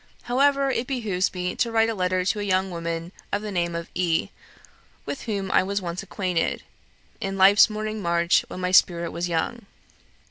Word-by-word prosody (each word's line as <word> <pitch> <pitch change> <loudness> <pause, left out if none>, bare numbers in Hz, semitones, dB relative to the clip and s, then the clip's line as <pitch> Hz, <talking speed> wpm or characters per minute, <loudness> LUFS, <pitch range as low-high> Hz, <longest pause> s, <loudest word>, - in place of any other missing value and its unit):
However, 275 +2 +2
it 245 -1 -2
behoves 215 -9 -1
me 180 -1 -3
to 235 - 0
write 225 0 +3
a 225 - -1
letter 185 -2 0
to 210 - 0
a - - -2
young 190 -1 0
woman 170 0 -4 0.2
of 205 - -1
the 210 - -4
name 170 -2 -1
of 170 0 -4
E., 170 -3 0 0.8
with 280 - -5
whom 200 -4 -3
I - - +5
was 200 +2 -1
once 175 -1 -4
acquainted, 185 -3 -2 0.6
'in 195 0 -3
life's 195 +3 +7
morning 215 0 -4
march, 170 -1 +2
when 185 - -7
my 180 0 -1
spirit 170 -2 +4
was 175 +1 -3
young.' 200 +7 -2
190 Hz, 185 wpm, -24 LUFS, 175-215 Hz, 0.8 s, life's